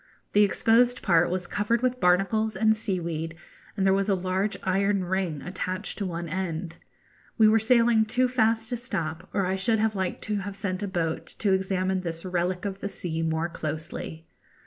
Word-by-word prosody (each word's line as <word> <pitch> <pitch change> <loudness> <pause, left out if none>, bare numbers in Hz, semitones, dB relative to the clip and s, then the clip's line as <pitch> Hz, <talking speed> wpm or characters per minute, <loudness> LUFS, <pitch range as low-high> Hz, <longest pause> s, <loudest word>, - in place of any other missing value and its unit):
The 205 - +5
exposed 235 +4 +3
part 175 -3 +4
was 180 0 -1
covered 215 +5 0
with 255 0 +1
barnacles 195 +4 +2
and 220 +2 +3
seaweed, 170 -6 -3 0.4
and 195 - +1
there 190 - +5
was 195 +1 +1
a 195 - +4
large 190 +3 -1
iron 195 +1 +1
ring 180 -5 -2
attached 185 +1 -4
to 200 - -1
one 170 -1 -4
end. 170 -1 -4 0.6
We 220 -2 +6
were 220 +1 +5
sailing 230 0 +4
too 250 +4 +2
fast 225 -2 +1
to 245 - -2
stop, 170 -10 -4
or 195 -2 0
I 185 +1 0
should 220 +4 +1
have 220 0 +1
liked 190 -2 -2
to 210 -1 -1
have 200 0 -5
sent 195 -1 -3
a 205 - -2
boat 165 -4 -2
to 200 -3 +2
examine 190 0 0
this 165 0 -5
'relic 180 +1 -1
of 195 -1 -3
the 200 - -4
sea' 165 -4 -3
more 160 +1 0
closely. 160 0 -5
190 Hz, 190 wpm, -26 LUFS, 175-215 Hz, 0.6 s, We